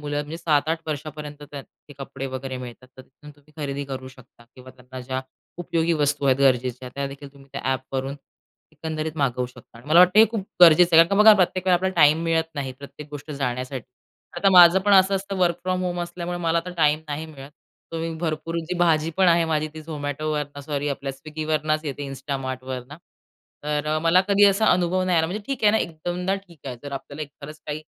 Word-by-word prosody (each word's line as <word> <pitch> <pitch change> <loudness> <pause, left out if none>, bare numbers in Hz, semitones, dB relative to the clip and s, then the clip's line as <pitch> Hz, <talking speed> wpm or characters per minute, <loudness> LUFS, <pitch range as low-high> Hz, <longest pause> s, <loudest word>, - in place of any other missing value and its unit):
मुलं 145 0 -4
म्हणजे 150 +3 -6
7-8 160 0 0
वर्षापर्यंत 150 0 -6
त्याचे 145 +1 -12
कपडे 135 0 -6
वगैरे 130 0 -5
मिळतात. 125 0 -10
तर 130 - -11
तिथून 150 +3 -16
तुम्ही 145 +1 -25
खरेदी 140 0 -3
करू 130 -1 -7
शकता 130 -2 -18
किंवा 130 0 -13
त्यांना 130 0 -10
ज्या 130 +1 -4 0.4
उपयोगी 170 -1 0
वस्तू 145 0 0
आहेत 130 -1 +4
गरजेच्या, 125 -2 +1
त्यादेखील 140 0 -6
तुम्ही 140 -1 -18
त्या - - -5
ॲपवरून 135 +1 -4 0.6
एकंदरीत 155 0 -5
मागवू 125 -4 0
शकता 125 -1 -16
आणि 120 - -17
मला 165 +3 +5
वाटतं 180 +3 +5
हे 220 - +9
खूप 215 -4 -4 0.2
गरजेचं 170 0 +7
आहे. 165 - +9
कारण - - -10
का - - +4
बघा, 220 - +10
प्रत्येक 185 -1 0
वेळेला 185 - +5
आपल्याला 190 +1 -2
टाईम 155 +3 +5
मिळत 165 -1 +1
नाही, 135 -2 -4
प्रत्येक 140 +1 -11
गोष्ट 145 +1 -9
जाण्यासाठी. 130 -2 -3 0.5
आता 195 +3 +3
माझं 180 0 +8
पण 205 +1 +2
असं 190 0 +5
असतं, 195 0 -3
वर्क 175 -2 +2
फ्रॉम 185 0 -1
होम 175 -1 -2
असल्यामुळे 175 0 -5
मला 170 -1 +1
आता 175 +2 -5
टाईम 150 -2 +3
नाही 150 +2 -4
मिळत. 140 -3 -12 0.4
तुम्ही 165 0 -3
भरपूर 160 0 -3
जी 180 - -2
भाजी 165 -2 +2
पण 190 -1 +4
आहे, 170 0 +4
माझी 155 -1 -1
ती 155 - -8
झोमॅटोवरनं 150 -1 -4
सॉरी 145 0 -3
आपल्या 140 -1 -4
स्विग्गीवरनच 155 +1 -2
येते 145 -1 -5
इन्स्टा 140 +1 -5
मार्टवरनं. 130 +1 -6 0.7
तर 150 +1 -1
मला 165 +2 +5
कधी 200 0 +5
असा 200 +2 +3
अनुभव 180 +1 +1
नाही 180 -2 +2
आला, 160 - +2
म्हणजे 200 +6 -5
ठीक 270 -4 -4
आहे 210 - +7
ना 220 - +2
एकदोनदा 175 +3 -3
ठीक 175 -5 -15
आहे. 125 -2 -5
तर 145 - -8
आपल्याला 140 +2 -6
एक 150 - -7
खरंच 155 +2 -9
काही 150 +1 -4
155 Hz, 205 wpm, -23 LUFS, 140-170 Hz, 0.7 s, बघा